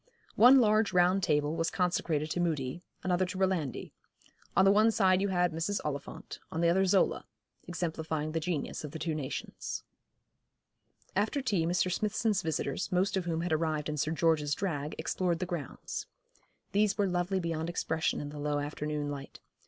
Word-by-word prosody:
One 255 +4 +8
large 215 -3 +3
round 180 +2 +4
table 150 -2 +1
was 165 0 0
consecrated 165 -4 0
to - - -1
Mudie, 160 -3 -1 0.2
another 185 0 +2
to 185 +1 -4
Rolandi. 185 -8 -1 0.7
On 190 - +6
the 195 - +7
one 215 +2 +5
side 190 -3 +3
you 200 - +1
had 180 -2 +2
Mrs. 165 +6 -1
Oliphant, 140 -2 -5
on 160 - -3
the 170 - +4
other 190 +2 +3
Zola, 190 +1 +2 0.4
exemplifying 160 -2 -2
the 165 - -1
genius 160 -3 -3
of 150 - -7
the - - -4
two 160 0 -2
nations. 145 -4 -5 1.3
After 210 +8 +1
tea 200 -11 0
Mr. 180 +1 +1
Smithson's 215 +1 0
visitors, 155 -4 -2
most 185 +2 +2
of 190 -2 -1
whom 165 -1 -1
had 170 -1 -1
arrived 155 -2 0
in 150 - -3
Sir 150 - 0
George's 160 -3 +2
drag, 150 -6 -3
explored 180 -2 0
the 185 - -2
grounds. 170 -7 -5 0.6
These 210 +1 +2
were 205 - +3
lovely 180 +1 0
beyond 165 -1 -2
expression 160 -1 -1
in 145 - -5
the 145 0 -8
low 145 0 0
afternoon 150 0 -3
light. 140 -1 -8
170 Hz, 175 wpm, -31 LUFS, 155-190 Hz, 1.3 s, One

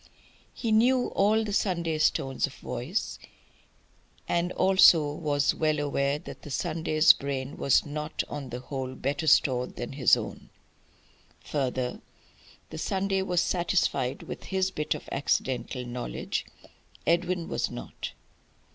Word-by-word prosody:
He 230 - -2
knew 245 +3 +4
all 215 +3 +2
the 210 -2 -4
Sunday's 170 -6 +2
tones 135 +1 -2
of 140 - -12
voice; 125 - -4 1.1
and 175 +1 +1
he - - -6
also 170 -6 +6
was 145 -1 +1
well 155 -1 +1
aware 140 -1 0
that 155 - -10
the 150 - -10
Sunday's 155 +2 +4
brain 135 -1 -4
was 140 - +3
not 150 +1 -3
on 140 -3 -6
the 125 +1 -6
whole 130 -1 -5
better 145 +5 -2
stored 125 -4 +3
than 120 - -5
his 135 -3 +5
own. - - -7 0.9
Further, 130 -3 -2 0.7
the 160 - -6
Sunday 195 +1 0
was 180 -2 +1
satisfied 175 -7 0
with - - -8
his 190 -1 0
bit 150 -3 -1
of - - -9
accidental 130 -2 -1
knowledge. 120 - -4 0.6
Edwin 175 0 +1
was - - -1
not. - - -7
150 Hz, 135 wpm, -28 LUFS, 135-180 Hz, 1.1 s, also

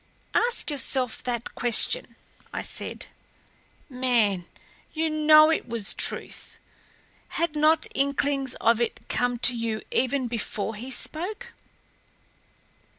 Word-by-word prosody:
"Ask 470 -8 +2
yourself 260 -4 0
that 240 -2 -3
question," 245 - +2 0.4
I - - -4
said. - - -5 0.8
"Man 235 - 0 0.5
you 320 0 -1
know 310 0 +6
it 315 - -2
was 225 -4 0
truth. - - -2 0.8
Had 335 -2 0
not 310 +1 +3
inklings 275 -1 0
of 230 0 +2
it 235 - -3
come 245 0 0
to 245 - +6
you 230 -2 -3
even 260 0 0
before 220 -2 -3
he 230 +5 -8
spoke? 415 - -3
260 Hz, 110 wpm, -25 LUFS, 235-310 Hz, 0.8 s, know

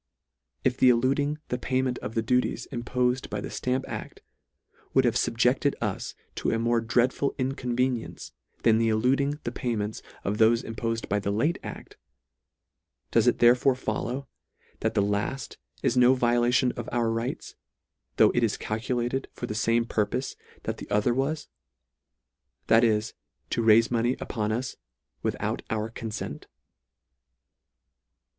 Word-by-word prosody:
If 125 0 +1
the 130 - +6
eluding 135 +5 +2
the 125 - -1
payment 130 0 0
of 110 - -6
the 115 - +1
duties 125 +2 0
im 120 -3 -3
pofed 125 +1 0
by 105 - -3
the - - -5
ftamp 130 +1 -1
act, - - -7 0.7
would 130 - +5
have 120 - +3
fubject 125 +1 +2
ed 140 - +2
us 105 -4 -3 0.2
to - - 0
a 115 - +1
more 115 0 +2
dreadful 125 +4 +1
inconvenience, 125 -2 -2 0.3
than 110 -1 +5
the 115 0 +2
eluding 135 +6 +2
the - - -3
payment 110 -5 -3 0.2
of 100 +2 -1
thofe 115 +2 +4
impofed 115 0 -3
by 105 - +1
the 100 - -2
late 125 +12 +1
act; - - -9 1.1
does - - +3
it - - +4
therefore 125 +2 +5
follow, 130 +1 -3 0.5
that - - -1
the 100 - +3
lalt 105 +6 -2 0.3
is 120 - +2
no 125 +1 +6
violation 120 +1 +3
of 120 -1 -6
our 115 -2 +1
rights, 115 +2 -3 0.6
though - - +6
it - - +1
is - - +1
calculated 120 +4 -2
for - - -5
the 115 - -4
fame 115 +2 +2
purpofe 115 +4 -1 0.3
that - - -3
the - - -9
other 105 +4 +2
was, 140 +5 -1 1.2
that 115 +1 +5
is, 110 -1 +2 0.4
to - - +1
raife 115 +1 +5
money 120 +1 +1
upon 105 -2 -2
us, 125 +4 -3 0.4
WITHOUT - - -2
OUR 110 0 -2
CONSENT 110 -1 -6
120 Hz, 150 wpm, -27 LUFS, 115-130 Hz, 1.2 s, the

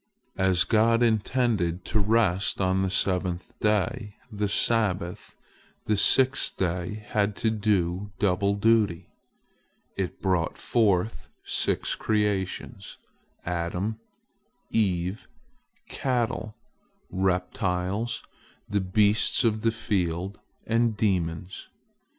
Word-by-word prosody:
As 95 -1 +3
God 115 +2 +3
intended 110 -6 +1
to 110 - 0
rest 105 -3 +2
on 95 0 +2
the 95 - 0
seventh 90 -1 -1
day, 105 0 0 0.2
the 105 -1 -1
Sabbath, 100 -6 0 0.5
the 105 - +2
sixth 130 +6 +3
day 90 +2 -1
had 105 -1 +1
to 110 - 0
do 100 -2 0
double 100 0 +1
duty. 105 -4 +2 0.8
It 95 -2 -3
brought 90 -4 0
forth 110 -2 +1 0.2
six - - -1
creations: 105 -4 -2 0.5
Adam, 90 +5 -2 0.7
Eve, 95 -2 0 0.6
cattle, 120 -4 -2 0.6
reptiles, 95 +3 -1 0.4
the 100 -1 0
beasts 105 +5 +2
of 110 -2 +1
the 115 0 +2
field, 95 -4 -2 0.3
and 115 -1 +1
demons. 90 -3 -1
100 Hz, 95 wpm, -26 LUFS, 90-110 Hz, 0.8 s, As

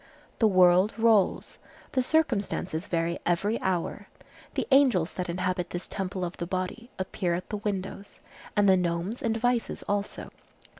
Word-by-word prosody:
The 225 - +5
world 185 +1 +5
rolls; 225 -4 +2 0.3
the 260 - +2
circumstances 205 - 0
vary 170 0 -1
every 195 +6 0
hour. 190 +2 -2 0.5
The - - 0
angels 255 - +4
that 180 -1 -4
inhabit 180 0 -1
this 175 - -5
temple 185 -2 -3
of 175 - -6
the 170 - -4
body 185 +6 -4
appear 185 -2 -1
at 180 - -6
the 210 - -1
windows, 200 -1 -5 0.4
and 205 -1 +4
the 190 -1 +6
gnomes 175 +5 -2
and 225 -1 0
vices 240 0 0
also. 205 0 -3
190 Hz, 150 wpm, -27 LUFS, 180-215 Hz, 0.5 s, the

